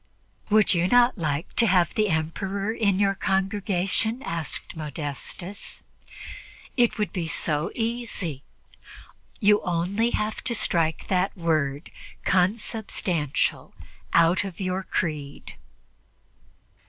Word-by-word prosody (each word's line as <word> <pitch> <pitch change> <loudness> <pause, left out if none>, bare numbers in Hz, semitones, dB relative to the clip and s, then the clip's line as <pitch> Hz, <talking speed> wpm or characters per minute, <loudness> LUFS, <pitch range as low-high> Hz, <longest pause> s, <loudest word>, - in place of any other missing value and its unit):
"Would 215 -1 +5
you 175 0 +2
not 245 0 +4
like 155 +2 -2
to 230 - +5
have 180 -3 +3
the 215 -1 +2
Emperor 195 +6 -1
in 200 -5 +2
your 200 0 +3
congregation?" 195 +4 0
asked 165 0 -3
Modestus. 155 +5 -6 0.9
"It 240 -2 +3
would 210 -1 -1
be 175 -4 -2
so 155 0 -1
easy. 225 - -3 1.0
You 210 -1 +5
have - - -11
only 185 +7 +1 0.3
to 235 - +1
strike 165 -6 +1
that 185 +1 +1
word 155 -3 0 0.3
'consubstantial' 185 - 0 0.4
out 170 +3 +4
of 195 -4 -7
your 185 0 -1
creed." 150 -6 -3
185 Hz, 105 wpm, -25 LUFS, 165-210 Hz, 1.0 s, Would